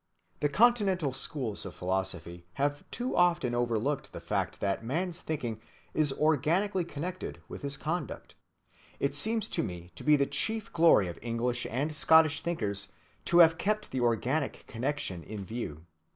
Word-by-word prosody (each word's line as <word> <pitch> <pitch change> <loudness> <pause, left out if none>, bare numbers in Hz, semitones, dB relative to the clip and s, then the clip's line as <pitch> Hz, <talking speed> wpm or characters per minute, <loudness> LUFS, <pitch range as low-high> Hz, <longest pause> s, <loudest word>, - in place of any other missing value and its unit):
The 145 - +2
Continental 195 - +3
schools 130 -5 -2
of 95 - -6
philosophy 90 -2 -3
have 145 +4 -1
too 245 +2 -3
often 175 -8 +3
overlooked 120 +3 -1
the - - -6
fact - - -2
that 100 +2 -1
man's 170 +8 -2
thinking 120 -8 -3 0.3
is 155 -2 +2
organically 160 +7 +2
connected 170 +3 -5
with - - -8
his 140 -1 -2
conduct. 170 +5 -4 0.7
It 140 0 0
seems 220 +9 +2
to - - 0
me 90 0 -6
to 85 - -10
be 150 0 +6
the 140 -1 +3
chief 210 +10 -3
glory 165 - +5
of 85 - -7
English 120 +2 -1
and 140 +7 -1
Scottish 160 0 +5
thinkers 105 - -2 0.4
to 170 - +3
have 165 +1 -1
kept 215 +2 -1
the 130 - -1
organic 125 +5 0
connection 115 - -3
in 105 -2 -7
view. 90 -8 -5
140 Hz, 155 wpm, -30 LUFS, 115-170 Hz, 0.7 s, be